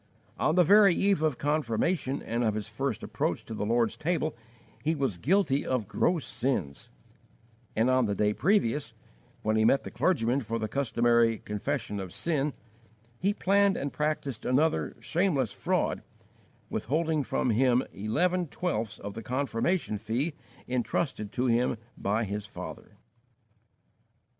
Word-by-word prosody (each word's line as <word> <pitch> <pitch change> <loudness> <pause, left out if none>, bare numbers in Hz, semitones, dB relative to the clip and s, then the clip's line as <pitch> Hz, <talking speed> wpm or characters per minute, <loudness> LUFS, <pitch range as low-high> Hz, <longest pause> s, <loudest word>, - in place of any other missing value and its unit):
On 155 - +2
the 180 - +6
very 200 +1 +6
eve 195 -4 +2
of 155 -5 +1
confirmation 145 +1 0
and 115 +2 -1
of 110 -2 +1
his 105 -1 -3
first 115 +1 -3
approach - - -2
to - - -7
the 105 -1 -2
Lord's 115 0 +2
Table 155 -1 -1 0.5
he 160 +3 +1
was 130 - -1
guilty 150 - +2
of 125 -6 -1
gross 160 - +1
sins; 115 - -2 0.9
and 110 +3 +3
on 130 -2 +3
the 100 - -1
day 105 +1 +2
previous, 150 - +1 0.5
when 110 0 +1
he 110 - +3
met 135 +5 +4
the - - -7
clergyman 135 -6 +1
for 115 -1 -3
the 110 -1 -2
customary 120 -3 +2
"confession 105 0 -3
of 95 -2 -6
sin," 150 -4 0 0.7
he 195 +3 +2
planned 200 -1 +3
and 140 0 -3
practised 150 -5 -2
another 150 +6 +1
shameless 160 - 0
fraud, - - 0 0.7
withholding 155 +2 0
from 125 - 0
him 125 +2 +3
eleven 175 - 0
twelfths 115 - -2
of 100 0 -7
the 115 - -6
confirmation 125 - -1
fee 120 +9 -1 0.3
entrusted 125 -3 -1
to 125 - -1
him 120 0 +2 0.2
by 105 +3 0
his 105 0 -4
father! - - -9
130 Hz, 145 wpm, -29 LUFS, 110-155 Hz, 0.9 s, the